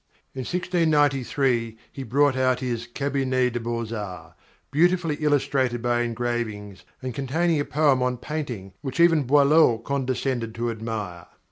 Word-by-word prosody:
In 135 - -7
1693 140 -8 +1
he 135 - -8
brought 135 +3 +2
out 130 -1 +2
his 120 -2 -3
"Cabinet 130 -1 0
des 120 - -1
Beaux 115 -1 -3
Arts," 100 -4 -7 0.4
beautifully 170 +2 +2
illustrated 135 -5 +1
by 120 0 +1
engravings, 115 -4 -3 0.2
and 130 -1 -3
containing 155 +5 0
a 145 - -1
poem 145 -4 +2
on 125 0 0
painting 120 -10 -5
which 135 +2 -5
even 165 -4 +5
Boileau 145 -2 +5
condescended 130 -2 -2
to 120 0 -1
admire. 110 -6 -5
130 Hz, 135 wpm, -24 LUFS, 115-145 Hz, 0.4 s, even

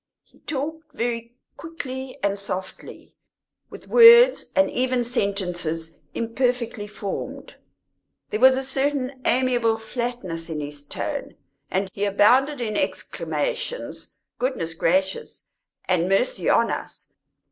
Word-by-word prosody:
He - - -27
talked 310 +1 -5
very 235 -2 -3 0.2
quickly 265 -5 -6
and 200 0 +1
softly, 190 -1 -6 0.6
with - - -12
words, 475 +1 +7
and 285 - +5
even 255 -1 +1
sentences, 180 -8 -1 0.2
imperfectly 235 -2 -1
formed; 205 -1 -6 0.8
there 215 - -1
was 260 +1 +6
a 265 - -1
certain 270 -1 -1
amiable 240 -3 +2
flatness 225 -7 -4
in 155 -2 -3
his 145 0 -6
tone, - - -4 0.3
and 190 +1 0
he 205 - -1
abounded 250 +8 +4
in 215 -3 -2
exclamations - - -3 0.2
"Goodness 245 -11 -2
gracious!" 190 +4 -1 0.4
and 180 -1 +1
"Mercy 195 - +1
on - - +3
us!" - - -7
240 Hz, 115 wpm, -24 LUFS, 195-265 Hz, 0.8 s, words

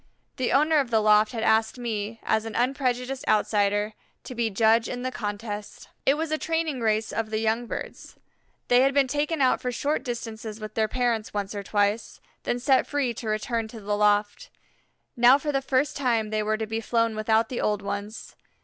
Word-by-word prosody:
The 255 - 0
owner 305 +2 +4
of 270 -4 -1
the 225 -2 +3
loft 215 0 +4
had 225 -3 -3
asked 220 +2 +2
me, 225 -2 -4
as 220 0 +1
an 225 - -6
unprejudiced 255 +1 -1
outsider, 205 0 +2 0.3
to - - -8
be 235 -2 0
judge 225 +2 +3
in 245 0 -4
the 255 - -2
contest. 205 -2 -6 0.2
It 275 - +5
was 320 +1 -3
a 310 - 0
training 325 -4 -1
race 220 0 0
of 225 -1 -2
the 215 - -1
young 225 +2 0
birds. - - -7 0.5
They 245 +1 +5
had 275 +1 +2
been 280 -2 +4
taken 295 +3 -1
out 255 - +3
for 250 - -2
short 285 +5 -1
distances 225 -3 -6
with 215 0 -7
their 220 -1 +1
parents 235 -3 -1
once 200 0 -2
or 205 - -4
twice, 205 +2 -1 0.3
then 240 - 0
set 260 +2 +2
free 280 -5 0
to 230 0 -7
return 220 +1 -1
to 225 +1 -10
the 205 0 -2
loft. 205 0 +1 0.7
Now 245 +2 +7
for 295 +1 -3
the 275 -1 0
first 265 +2 0
time 230 -6 0
they 215 0 0
were 215 +1 0
to 220 - -2
be 225 +1 -3
flown 230 -1 0
without 220 +1 +1
the 250 - -3
old 210 -1 0
ones. 205 +2 -6
225 Hz, 205 wpm, -26 LUFS, 215-255 Hz, 0.7 s, Now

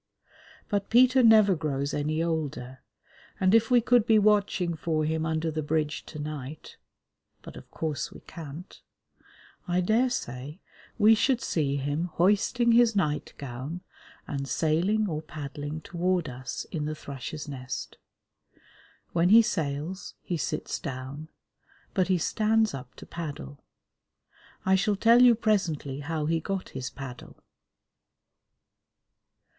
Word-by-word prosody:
But 200 -1 -1
Peter 255 +2 +6
never 220 -4 +6
grows 140 -3 -2
any 155 +2 0
older, 140 -6 -3 0.6
and 185 +1 +3
if 225 0 +4
we 245 -1 +5
could 240 -1 +3
be 220 - +5
watching 200 -4 +2
for 155 -1 -1
him 160 +1 -1
under 160 0 -1
the 155 0 -2
bridge 150 0 -2
to 155 - -9
night 150 -1 -7 0.7
(but, - - -10
of - - -12
course, 155 -3 -3
we - - -12
can't), 160 +2 -10 0.9
I 180 0 +1
daresay 180 - -1 0.4
we 220 0 +6
should 250 +3 +2
see 145 - -1
him 145 +4 -1
hoisting 210 +6 +3
his 230 -1 +5
night 150 -7 -1
gown 140 +6 -6 0.5
and 140 -1 -4
sailing 180 +7 +1
or 155 -4 -3
paddling 150 0 -6
toward 175 0 -1
us 125 -1 -6
in 155 -3 -2
the 155 0 -3
Thrush's 145 +1 -7
Nest. 130 -3 -6 1.1
When 170 +1 +2
he 225 +3 +8
sails, 160 -3 -3
he 175 - -2
sits 155 -1 -3
down, 135 +3 -6 0.7
but 185 -3 +2
he 185 -1 +3
stands 220 +5 +1
up 130 -2 -8
to - - -11
paddle. 145 - -7 1.0
I 190 - +3
shall 195 +2 +2
tell 230 +4 +5
you 245 -2 +7
presently 170 -11 0
how 155 +1 -3
he 165 +1 +1
got 195 +3 -4
his 130 -1 -5
paddle. 130 -3 -10
160 Hz, 135 wpm, -27 LUFS, 145-205 Hz, 1.1 s, he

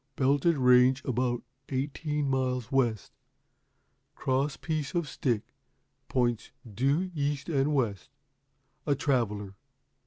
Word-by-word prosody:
Belted 145 +4 +2
Range 125 +1 +5
about 125 -1 0 0.3
eighteen 145 +2 -2
miles 130 -2 -1
west. 120 -6 +1 1.0
Cross 135 +2 0
piece 155 -2 -3
on 170 - +2
stick, 120 -7 -2 0.6
points 120 -3 0 0.2
due 140 - 0
east 145 0 -2
and 140 -1 +1
west. 110 -8 -1 0.8
A 145 - +3
Traveler.'" 105 -8 -1
135 Hz, 100 wpm, -29 LUFS, 125-145 Hz, 1.0 s, Range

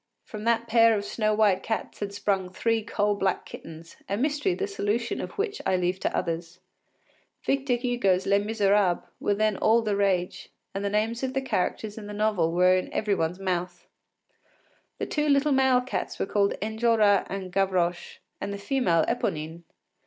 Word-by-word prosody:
From 215 0 -8
that 230 0 +2
pair 230 -1 +5
of 205 - -4
snow 215 0 0
white 210 -3 +3
cats 220 - -4
had 205 -1 -3
sprung 195 -2 -1
three 225 +4 0
coal 210 -1 0
black 195 -2 -1
kittens, 165 +1 -11
a 200 - 0
mystery 295 - 0
the 405 - -2
solution 235 - -2
of - - -6
which 410 0 -2
I 190 - +1
leave 180 +1 0
to - - -1
others. 170 +1 -3 0.8
Victor 270 -2 +1
Hugo’s 240 -7 +1
“Les 200 0 +3
Misérables” 205 -3 +2 0.2
were 205 - +1
then 215 -1 +1
all 225 +1 +3
the 210 -2 0
rage, 190 -3 0 0.2
and 195 - -3
the 200 - 0
names 220 +3 0
of 260 0 -3
the 270 - +1
characters 215 -2 -2
in 205 - -9
the 210 - -7
novel 205 -6 +1
were 180 +2 +4
in 185 - -2
every 210 -1 0
one’s 165 -1 -1
mouth. 180 -2 -3 1.1
The - - -2
two 300 -1 -1
little 280 +1 +3
male 265 -2 +4
cats 255 - -4
were - - -1
called 200 0 +1
Enjolras 220 -2 +2
and 190 -1 -5
Gavroche, 180 -3 0 0.2
and - - -3
the 200 - -4
female 200 - +1
Eponine. 160 +2 -2
205 Hz, 180 wpm, -26 LUFS, 185-230 Hz, 1.1 s, pair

